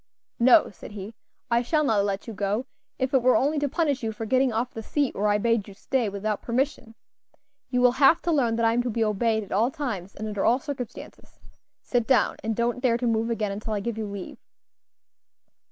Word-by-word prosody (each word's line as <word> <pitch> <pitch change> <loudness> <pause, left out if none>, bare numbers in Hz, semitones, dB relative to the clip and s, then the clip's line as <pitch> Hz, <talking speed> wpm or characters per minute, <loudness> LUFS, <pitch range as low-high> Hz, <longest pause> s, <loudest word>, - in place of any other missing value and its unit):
"No," 240 +1 +6
said 205 - -12
he, 205 +2 -7 0.4
"I 235 0 +4
shall 305 +5 +1
not 220 -8 +2
let 200 -1 -2
you 225 - -7
go, 205 +4 -1 0.3
if 260 0 -2
it 265 - +4
were 255 +1 +4
only 295 +3 +2
to 285 0 0
punish 290 -2 0
you 225 -2 -2
for 220 +1 -6
getting 260 +3 +2
off 235 +3 -2
the 225 - -6
seat 285 +4 -1
where 205 +2 0
I 205 0 +3
bade 230 -1 +1
you 200 - -11
stay, 240 +1 -1
without 205 +1 -3
permission. 250 -2 -2 0.7
You 250 -1 +1
will 250 0 +6
have 280 +5 +7
to 345 - 0
learn 245 -7 +2
that 230 0 +1
I 225 - +3
am 240 - +2
to 245 - -2
be 230 0 0
obeyed 220 +1 +1
at 200 - -14
all 220 +5 +2
times, 220 -10 -5
and 215 - -5
under 205 -2 -2
all 240 - +4
circumstances. 265 -5 -8 0.4
Sit 240 -3 0
down, 260 - +3
and 220 0 -1
don't 240 +2 -1
dare 240 -3 +2
to 245 - -3
move 230 0 +1
again 215 -3 -1
until 215 +2 -4
I 210 - -1
give 230 +2 -3
you 220 -1 -4
leave." 200 -2 -7
230 Hz, 225 wpm, -25 LUFS, 210-255 Hz, 0.7 s, have